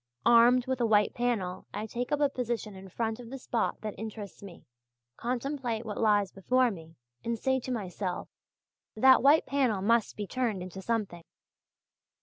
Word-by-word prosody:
Armed 240 Hz, +1 st, +6 dB
with 260 Hz, -1 st, -2 dB
a -, -, +3 dB
white 210 Hz, -1 st, +3 dB
panel 205 Hz, -7 st, -2 dB
I 210 Hz, +1 st, -3 dB
take 240 Hz, +3 st, -4 dB
up 295 Hz, -, +1 dB
a 290 Hz, -, +5 dB
position 240 Hz, -5 st, -3 dB
in 190 Hz, 0 st, -11 dB
front 225 Hz, +4 st, -2 dB
of 240 Hz, -2 st, -10 dB
the 270 Hz, -, -6 dB
spot 240 Hz, -2 st, -2 dB
that 215 Hz, -1 st, -4 dB
interests 215 Hz, -2 st, -7 dB
me, 195 Hz, -4 st, -12 dB, 0.5 s
contemplate 245 Hz, -2 st, -3 dB
what 210 Hz, -2 st, -5 dB
lies 205 Hz, -3 st, +3 dB
before 250 Hz, +5 st, +2 dB
me, 165 Hz, -4 st, -11 dB, 0.3 s
and 230 Hz, 0 st, -2 dB
say 265 Hz, +3 st, +1 dB
to 255 Hz, -, -6 dB
myself, 190 Hz, -5 st, -3 dB, 0.7 s
'that 260 Hz, +4 st, +6 dB
white 285 Hz, +4 st, +5 dB
panel 260 Hz, -7 st, +1 dB
must 230 Hz, +1 st, +2 dB
be 210 Hz, -, -3 dB
turned 220 Hz, -5 st, -2 dB
into 185 Hz, +1 st, -8 dB
something! 200 Hz, -6 st, -2 dB
230 Hz, 170 wpm, -29 LUFS, 205-250 Hz, 0.7 s, Armed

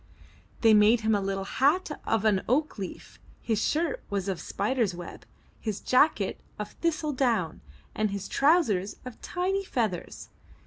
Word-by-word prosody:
They 225 Hz, -2 st, +6 dB
made 215 Hz, +3 st, +5 dB
him 220 Hz, 0 st, +2 dB
a 205 Hz, -, +2 dB
little 195 Hz, 0 st, -2 dB
hat 290 Hz, -, +1 dB, 0.2 s
of 225 Hz, -1 st, +1 dB
an 200 Hz, -3 st, +3 dB
oak 285 Hz, -1 st, +1 dB
leaf; 190 Hz, -, -8 dB, 0.2 s
his 220 Hz, -2 st, -1 dB
shirt 320 Hz, 0 st, 0 dB
was 200 Hz, -1 st, -2 dB
of 190 Hz, -3 st, -2 dB
spider's 215 Hz, -3 st, -1 dB
web, 175 Hz, 0 st, -9 dB, 0.3 s
his 215 Hz, -3 st, -3 dB
jacket 255 Hz, -7 st, +2 dB, 0.2 s
of 210 Hz, -, -5 dB
thistledown, 265 Hz, -, 0 dB, 0.3 s
and 215 Hz, 0 st, 0 dB
his 200 Hz, -1 st, -4 dB
trousers 275 Hz, -, +2 dB
of 250 Hz, -2 st, -9 dB
tiny 380 Hz, +2 st, -1 dB
feathers. 220 Hz, -, -3 dB
220 Hz, 145 wpm, -28 LUFS, 200-285 Hz, 0.3 s, They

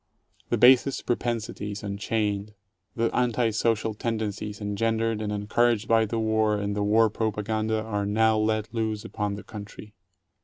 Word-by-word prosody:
The 120 Hz, -, +1 dB
basest 130 Hz, +3 st, +5 dB
propensities 115 Hz, -3 st, -3 dB
unchained, 105 Hz, 0 st, -2 dB, 0.4 s
the 115 Hz, 0 st, 0 dB
anti 120 Hz, -1 st, +1 dB
social 110 Hz, 0 st, 0 dB
tendencies 105 Hz, -2 st, -3 dB
engendered 110 Hz, +2 st, -1 dB
and 105 Hz, -1 st, -2 dB
encouraged 110 Hz, +2 st, +1 dB
by 115 Hz, -1 st, +4 dB
the 115 Hz, +2 st, -3 dB
war, 110 Hz, -1 st, +1 dB
and 100 Hz, 0 st, -2 dB
the 105 Hz, -, -1 dB
war 110 Hz, +2 st, +4 dB
propaganda, 110 Hz, 0 st, -1 dB
are 105 Hz, -2 st, -2 dB
now 110 Hz, +1 st, +3 dB
let 110 Hz, +1 st, -1 dB
loose 110 Hz, -1 st, -2 dB
upon 105 Hz, -3 st, -3 dB
the 100 Hz, -, -9 dB
country. 105 Hz, -1 st, -10 dB
110 Hz, 145 wpm, -26 LUFS, 105-115 Hz, 0.4 s, basest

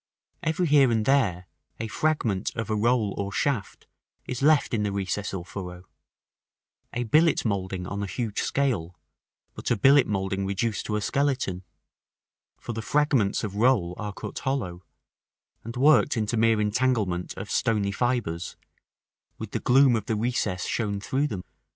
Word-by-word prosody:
Every 165 Hz, +1 st, 0 dB
here 145 Hz, -4 st, +5 dB
and 110 Hz, -2 st, +1 dB
there, 100 Hz, -10 st, +2 dB, 0.3 s
a 110 Hz, -, -3 dB
fragment 115 Hz, -7 st, -1 dB
of 115 Hz, -1 st, -3 dB
a -, -, +1 dB
roll 110 Hz, -1 st, +2 dB
or 100 Hz, 0 st, -2 dB
shaft 125 Hz, -2 st, -2 dB, 0.4 s
is 125 Hz, 0 st, -4 dB
left 150 Hz, -1 st, +4 dB
in 110 Hz, -, +1 dB
the 105 Hz, -1 st, 0 dB
recess 100 Hz, +1 st, -2 dB
or 90 Hz, -3 st, -5 dB
furrow: 90 Hz, -1 st, -7 dB, 1.1 s
a 120 Hz, -, -2 dB
billet 155 Hz, +7 st, +3 dB
moulding 95 Hz, -3 st, -2 dB
on 100 Hz, +2 st, -4 dB
a 100 Hz, -, -2 dB
huge 110 Hz, 0 st, -3 dB
scale, 110 Hz, -12 st, -1 dB, 0.5 s
but -, -, -5 dB
a 120 Hz, -, +3 dB
billet 140 Hz, +4 st, +5 dB
moulding 95 Hz, -1 st, -1 dB
reduced 100 Hz, +3 st, -2 dB
to 105 Hz, -, -1 dB
a 105 Hz, -, -1 dB
skeleton; 130 Hz, -8 st, 0 dB, 1.0 s
for 120 Hz, -, -6 dB
the 115 Hz, -, -4 dB
fragments 130 Hz, -3 st, +1 dB
of 100 Hz, -2 st, -4 dB
roll 110 Hz, -7 st, +3 dB
are 105 Hz, -1 st, -3 dB
cut -, -, -7 dB
hollow, 95 Hz, -11 st, -2 dB, 0.8 s
and 115 Hz, +2 st, -7 dB
worked 145 Hz, 0 st, +4 dB
into 110 Hz, +1 st, 0 dB
mere 115 Hz, -1 st, +3 dB
entanglement 105 Hz, -5 st, 0 dB
of 100 Hz, +2 st, -6 dB
stony 105 Hz, -4 st, +1 dB
fibres, 105 Hz, -8 st, -1 dB, 0.8 s
with -, -, -7 dB
the -, -, -2 dB
gloom 130 Hz, 0 st, +5 dB
of 110 Hz, -, -3 dB
the 110 Hz, -, 0 dB
recess 105 Hz, -5 st, -1 dB
shown 105 Hz, -3 st, -1 dB
through 135 Hz, +8 st, 0 dB
them. 95 Hz, -9 st, -5 dB
110 Hz, 160 wpm, -26 LUFS, 100-130 Hz, 1.1 s, here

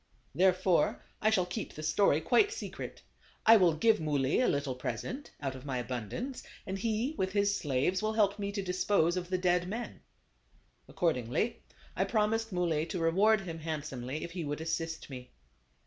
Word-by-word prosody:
Therefore, 185 Hz, 0 st, +2 dB, 0.2 s
I 215 Hz, -, +4 dB
shall 195 Hz, -5 st, +2 dB
keep 180 Hz, +5 st, -5 dB
the 155 Hz, -, -7 dB
story 155 Hz, 0 st, +3 dB
quite 250 Hz, -, +3 dB
secret. 455 Hz, -, -7 dB, 0.4 s
I 225 Hz, -, +9 dB
will 175 Hz, -5 st, +4 dB
give 220 Hz, +7 st, +3 dB
Muley 145 Hz, -3 st, +1 dB
a 255 Hz, -, +3 dB
little 140 Hz, -2 st, 0 dB
present, 255 Hz, -, -5 dB
out 135 Hz, -2 st, -3 dB
of 130 Hz, -1 st, -10 dB
my 135 Hz, -3 st, -3 dB
abundance, 125 Hz, -, -4 dB, 0.2 s
and 195 Hz, 0 st, -4 dB
he, 230 Hz, +6 st, 0 dB
with 190 Hz, 0 st, 0 dB
his 200 Hz, 0 st, +2 dB
slaves, 145 Hz, +6 st, 0 dB
will 215 Hz, 0 st, 0 dB
help 205 Hz, -2 st, +2 dB
me 200 Hz, 0 st, -2 dB
to 200 Hz, -1 st, -2 dB
dispose 180 Hz, -2 st, +2 dB
of 180 Hz, -1 st, -3 dB
the 185 Hz, -, +1 dB
dead 180 Hz, -1 st, +1 dB
men." 230 Hz, +5 st, -5 dB, 0.9 s
Accordingly, 155 Hz, -, -1 dB, 0.3 s
I -, -, +1 dB
promised 225 Hz, 0 st, 0 dB
Muley 170 Hz, -3 st, 0 dB
to 180 Hz, -, -4 dB
reward 195 Hz, +6 st, +3 dB
him 165 Hz, -4 st, -6 dB
handsomely 150 Hz, -3 st, -4 dB
if 170 Hz, -, -6 dB
he 175 Hz, -1 st, -4 dB
would 145 Hz, 0 st, -3 dB
assist 160 Hz, 0 st, -3 dB
me. 125 Hz, -1 st, -8 dB
180 Hz, 175 wpm, -31 LUFS, 155-210 Hz, 0.9 s, I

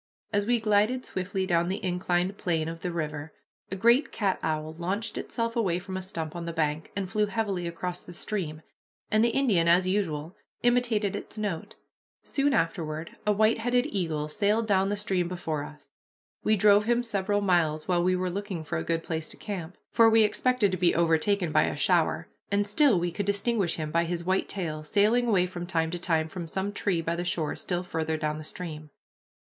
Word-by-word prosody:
As 205 Hz, 0 st, +1 dB
we 240 Hz, 0 st, +3 dB
glided 220 Hz, +4 st, +2 dB
swiftly 190 Hz, +1 st, -2 dB
down 170 Hz, -2 st, +2 dB
the 190 Hz, +1 st, -3 dB
inclined 180 Hz, +1 st, 0 dB
plane 165 Hz, -3 st, 0 dB
of 165 Hz, 0 st, -5 dB
the 180 Hz, -, -2 dB
river, 155 Hz, -2 st, -4 dB, 0.4 s
a 195 Hz, -, -3 dB
great 235 Hz, +8 st, +4 dB
cat 200 Hz, -4 st, 0 dB
owl 155 Hz, 0 st, -2 dB
launched 190 Hz, +7 st, -2 dB
itself 230 Hz, -1 st, -3 dB
away 190 Hz, -7 st, +1 dB
from 190 Hz, +1 st, -6 dB
a 190 Hz, -, -2 dB
stump 165 Hz, -4 st, -5 dB
on 170 Hz, -1 st, -4 dB
the 170 Hz, -, -3 dB
bank, 155 Hz, -1 st, -1 dB
and 200 Hz, -1 st, -2 dB
flew 210 Hz, +3 st, +1 dB
heavily 200 Hz, -5 st, -2 dB
across 175 Hz, +1 st, -4 dB
the -, -, -11 dB
stream, 170 Hz, -4 st, -4 dB, 0.5 s
and 215 Hz, +1 st, +4 dB
the 235 Hz, -, +4 dB
Indian, 225 Hz, -10 st, +2 dB
as 180 Hz, +2 st, +5 dB
usual, 170 Hz, -5 st, -1 dB, 0.3 s
imitated 235 Hz, -5 st, +2 dB
its 205 Hz, -, -8 dB
note. 205 Hz, -6 st, -3 dB, 0.5 s
Soon 285 Hz, 0 st, +1 dB
afterward 165 Hz, -, -1 dB, 0.2 s
a -, -, +5 dB
white 215 Hz, +2 st, +3 dB
headed 245 Hz, +2 st, +2 dB
eagle 160 Hz, -6 st, -1 dB
sailed 210 Hz, +7 st, +1 dB
down 195 Hz, -2 st, +2 dB
the 205 Hz, -, -1 dB
stream 190 Hz, -4 st, 0 dB
before 165 Hz, -4 st, -3 dB
us. 150 Hz, 0 st, -12 dB, 0.6 s
We 215 Hz, -, +3 dB
drove 205 Hz, +1 st, +5 dB
him 240 Hz, +1 st, +2 dB
several 205 Hz, -2 st, 0 dB
miles, 165 Hz, -5 st, +1 dB
while 175 Hz, -2 st, +2 dB
we 185 Hz, +1 st, +3 dB
were 180 Hz, 0 st, -1 dB
looking 195 Hz, -3 st, -4 dB
for 115 Hz, -, -3 dB
a -, -, -3 dB
good 165 Hz, -, -1 dB
place 160 Hz, -1 st, -4 dB
to -, -, -9 dB
camp, 185 Hz, -4 st, -6 dB
for 230 Hz, -1 st, +6 dB
we 225 Hz, 0 st, +6 dB
expected 215 Hz, 0 st, +2 dB
to 185 Hz, -, -1 dB
be 175 Hz, -1 st, +3 dB
overtaken 170 Hz, +2 st, +2 dB
by -, -, +4 dB
a -, -, -2 dB
shower, -, -, +2 dB, 0.2 s
and 200 Hz, 0 st, +2 dB
still 215 Hz, -, +4 dB
we 175 Hz, 0 st, -1 dB
could 200 Hz, +3 st, -3 dB
distinguish 200 Hz, -2 st, +1 dB
him 155 Hz, -1 st, -4 dB
by 170 Hz, +1 st, +2 dB
his 170 Hz, 0 st, -3 dB
white 185 Hz, +2 st, 0 dB
tail, 155 Hz, -6 st, -3 dB
sailing 215 Hz, +8 st, +3 dB
away 190 Hz, -5 st, +3 dB
from 175 Hz, -1 st, -6 dB
time 165 Hz, -3 st, 0 dB
to 175 Hz, -, -3 dB
time 165 Hz, -3 st, +1 dB
from 170 Hz, 0 st, -6 dB
some 190 Hz, +5 st, -2 dB
tree 185 Hz, -5 st, 0 dB
by 165 Hz, +1 st, -1 dB
the 175 Hz, -, -2 dB
shore 165 Hz, -3 st, -1 dB
still 175 Hz, -1 st, -2 dB
farther 160 Hz, -2 st, -2 dB
down 155 Hz, 0 st, -2 dB
the -, -, -7 dB
stream. 155 Hz, -2 st, -6 dB
185 Hz, 205 wpm, -28 LUFS, 165-205 Hz, 0.6 s, for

